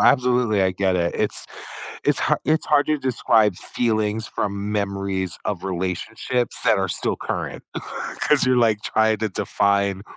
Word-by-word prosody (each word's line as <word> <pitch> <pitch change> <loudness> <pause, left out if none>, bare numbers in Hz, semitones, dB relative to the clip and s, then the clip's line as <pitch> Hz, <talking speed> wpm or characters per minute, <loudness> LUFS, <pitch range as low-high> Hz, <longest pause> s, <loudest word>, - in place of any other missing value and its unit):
absolutely. 125 -5 +3
I 95 -1 +2
get 95 0 +1
it, 85 -1 0
it's - - -2 0.6
it's - - +2
har - - +1
it's 155 +1 +1
hard 145 -1 +3
to 155 -1 +1
describe 110 -5 +2
feelings 110 -2 -1
from 100 0 -3
memories 100 -3 -2
of 95 -3 -3
relationships 95 +7 -2
that - - +4
are 95 0 0
still - - -1
current. - - -4 0.6
'Cause 150 -2 +4
you're 130 0 +3
like 115 -4 +3
trying 110 0 +2
to 110 0 -1
define 100 0 0
105 Hz, 155 wpm, -22 LUFS, 95-120 Hz, 0.6 s, that